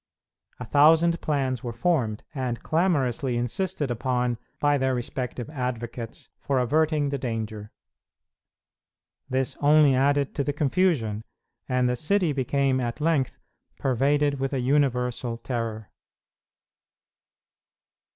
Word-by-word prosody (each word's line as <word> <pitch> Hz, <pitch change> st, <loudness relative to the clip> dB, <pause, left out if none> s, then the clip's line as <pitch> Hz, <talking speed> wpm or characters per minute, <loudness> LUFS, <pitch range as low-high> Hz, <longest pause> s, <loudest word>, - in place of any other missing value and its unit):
A 125 Hz, -, -5 dB
thousand 160 Hz, +6 st, +4 dB
plans 135 Hz, -4 st, -1 dB
were 120 Hz, -, -3 dB
formed, 120 Hz, -6 st, 0 dB
and 125 Hz, -4 st, -3 dB
clamorously 140 Hz, -7 st, +1 dB
insisted 145 Hz, +4 st, -2 dB
upon 125 Hz, 0 st, -1 dB, 0.2 s
by 145 Hz, -1 st, +2 dB
their 130 Hz, 0 st, +1 dB
respective 125 Hz, 0 st, -4 dB
advocates, 120 Hz, -4 st, -5 dB
for 140 Hz, -1 st, -1 dB
averting 150 Hz, +3 st, +2 dB
the 140 Hz, -1 st, -2 dB
danger. 110 Hz, -4 st, -4 dB, 1.6 s
This 130 Hz, 0 st, 0 dB
only 145 Hz, -1 st, +5 dB
added 140 Hz, +1 st, +2 dB
to 140 Hz, -, -1 dB
the 145 Hz, -, -1 dB
confusion, 140 Hz, -, +1 dB, 0.5 s
and 125 Hz, -1 st, +2 dB
the 125 Hz, -, +1 dB
city 175 Hz, +3 st, +1 dB
became 135 Hz, 0 st, +1 dB
at 120 Hz, +1 st, -3 dB
length 150 Hz, -4 st, +1 dB, 0.4 s
pervaded 140 Hz, +2 st, +1 dB
with 135 Hz, +1 st, -2 dB
a 135 Hz, -, 0 dB
universal 125 Hz, -3 st, 0 dB
terror. 115 Hz, -4 st, -4 dB
130 Hz, 110 wpm, -26 LUFS, 120-145 Hz, 1.6 s, only